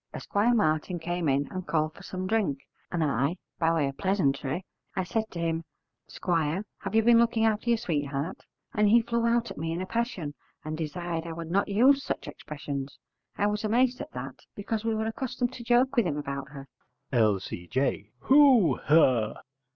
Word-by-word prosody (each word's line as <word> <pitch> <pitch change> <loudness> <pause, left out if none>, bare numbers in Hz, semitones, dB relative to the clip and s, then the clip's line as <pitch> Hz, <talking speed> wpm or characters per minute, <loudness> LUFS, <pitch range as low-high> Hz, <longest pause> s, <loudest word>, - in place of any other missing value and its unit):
Esquire 225 +4 +1
Martin 160 -2 +1
came 175 -1 -2
in 140 +1 +1
and 185 -1 -5
called 155 -1 0
for - - -14
some 185 0 -5
drink, 195 -9 +1 0.3
and 170 -2 0
I, 140 +4 0 0.2
by 165 -1 +3
way 160 -4 +1
of 135 - -6
pleasantry, 175 -4 0 0.3
I 190 - 0
said 220 +5 -1
to 170 - -7
him, 165 0 -1 0.4
"Squire, 170 +2 -1
have 195 +2 -4
you 225 - +5
been 235 0 +6
looking 230 -1 +3
after 220 +2 +1
your 235 - +4
sweetheart?" 150 -5 -2 0.3
and 210 0 +3
he 230 +2 +6
flew 235 0 0
out 235 0 +1
at - - -8
me 165 +1 -2
in 165 - -2
a 185 - -2
passion 230 - -2 0.3
and 155 0 -3
desired 165 +1 -4
I 165 - -4
would 165 0 -6
not 200 +3 +2
use 260 +7 +4
such - - -4
expressions. 140 -2 -6 0.4
I 205 - +2
was 210 +1 0
amazed 245 +4 +2
at - - -6
that, 130 +1 -7 0.2
because 215 +2 -3
we 225 -1 0
were 220 0 -1
accustomed 245 +2 -2
to 245 - -8
joke 245 +3 +3
with 235 -7 +3
him 150 -3 -2
about 140 -1 -4
her. 135 -1 -10 0.5
L.C.J. 105 +1 0
Who, 260 - +6
her? 130 -8 +3
175 Hz, 190 wpm, -28 LUFS, 145-225 Hz, 0.5 s, been